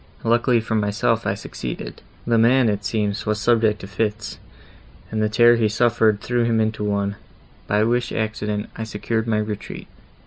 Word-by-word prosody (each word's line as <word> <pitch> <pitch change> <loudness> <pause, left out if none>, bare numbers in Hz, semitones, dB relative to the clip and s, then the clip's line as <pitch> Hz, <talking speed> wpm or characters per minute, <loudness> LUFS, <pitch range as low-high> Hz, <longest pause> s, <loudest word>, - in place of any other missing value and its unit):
Luckily 120 +1 +3
for 110 - -4
myself 105 -1 0
I - - 0
succeeded; - - -7 0.2
the 115 -1 +2
man, 120 +1 +4
it 100 -1 -2
seems, 105 +1 -2
was 105 0 0
subject 110 -2 +2
to 95 - -8
fits, 105 +1 -3 0.7
and 110 -1 -1
the 105 - +1
terror 120 +2 +5
he 110 -2 +2
suffered 110 -2 +2
threw 120 -1 0
him 115 -1 +1
into 110 -1 -1
one, 100 -1 -1 0.5
by 105 +1 +2
which 120 +2 0
accident 105 -1 -3
I 110 - -4
secured 110 +1 -3
my 110 -1 +1
retreat. 105 -1 -5
110 Hz, 170 wpm, -22 LUFS, 105-115 Hz, 0.7 s, terror